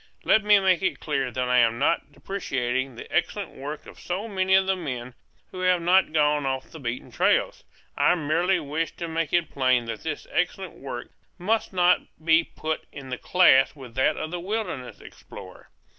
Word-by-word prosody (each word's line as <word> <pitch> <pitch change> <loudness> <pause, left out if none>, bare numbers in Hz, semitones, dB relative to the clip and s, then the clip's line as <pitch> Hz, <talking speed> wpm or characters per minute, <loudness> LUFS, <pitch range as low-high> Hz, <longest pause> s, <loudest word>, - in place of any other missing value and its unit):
Let 220 - +4
me 210 0 +6
make 190 -2 +2
it 190 - -1
clear 140 -4 -1
that 125 +1 -2
I 125 0 +4
am 115 -1 +3
not 165 - 0
depreciating 130 -9 -3
the - - -8
excellent 175 +2 -1
work 145 +3 -7
of - - -13
so 190 +5 -4
many 190 -2 +2
of 190 0 +4
the 190 0 +1
men 125 -8 -5 0.4
who 185 - -8
have 185 -1 +3
not 180 +1 +3
gone 150 -1 +2
off 130 -1 -3
the 160 - -10
beaten 120 -2 -5
trails. - - +1 0.3
I - - +4
merely 175 +4 +1
wish 155 +2 -3
to 170 - -5
make 165 -2 -2
it 175 -2 +1
plain 130 -3 +2
that 115 -2 -5
this 155 -2 -4
excellent 180 +1 -1
work 125 -3 -7 0.3
must 215 +5 0
not 180 -1 +4 0.3
be 165 0 +5
put 160 -1 -4
in 135 -2 -9
the 125 - -4
class 155 -8 +4
with 130 -5 -11
that 130 +2 +1
of 155 - -4
the 175 - -3
wilderness 180 - -4
explorer. - - -13
160 Hz, 190 wpm, -25 LUFS, 130-185 Hz, 0.4 s, me